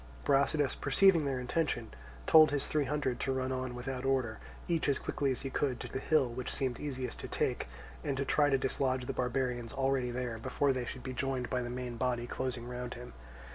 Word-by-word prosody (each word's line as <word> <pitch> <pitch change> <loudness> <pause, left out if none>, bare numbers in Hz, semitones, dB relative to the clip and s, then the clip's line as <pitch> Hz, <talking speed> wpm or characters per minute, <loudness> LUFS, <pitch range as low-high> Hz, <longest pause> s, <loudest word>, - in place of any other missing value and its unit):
Brasidas, 140 - +3
perceiving 190 -6 +4
their 135 -2 0
intention, 125 -3 -1 0.3
told 155 -1 +8
his 145 -1 0
three 150 -2 +1
hundred 135 -3 -1
to 135 - 0
run 130 0 -1
on 130 -1 -3
without 125 +1 -4
order, 130 -5 0 0.3
each 165 -4 +1
as 140 - +3
quickly 140 -2 -1
as 130 - -2
he 135 - -3
could, 130 -4 0
to - - -5
the - - -4
hill 150 -1 +3
which 120 +1 -4
seemed 130 -3 -1
easiest 130 -4 -4
to - - -5
take, - - -1 0.4
and 140 -2 -1
to 140 - 0
try 145 +1 +3
to 135 - +4
dislodge 130 -1 0
the - - -3
barbarians 125 -2 -1
already 135 -2 +1
there, 120 -2 -3
before 140 +4 +1
they 125 -1 -2
should 125 +1 -6
be 130 - -4
joined 130 -1 -2
by 125 -1 +1
the 120 - -4
main 125 -1 -4
body 120 0 0
closing 120 -1 -3
round 125 0 -5
him. 120 +1 -9
130 Hz, 215 wpm, -32 LUFS, 125-140 Hz, 0.4 s, told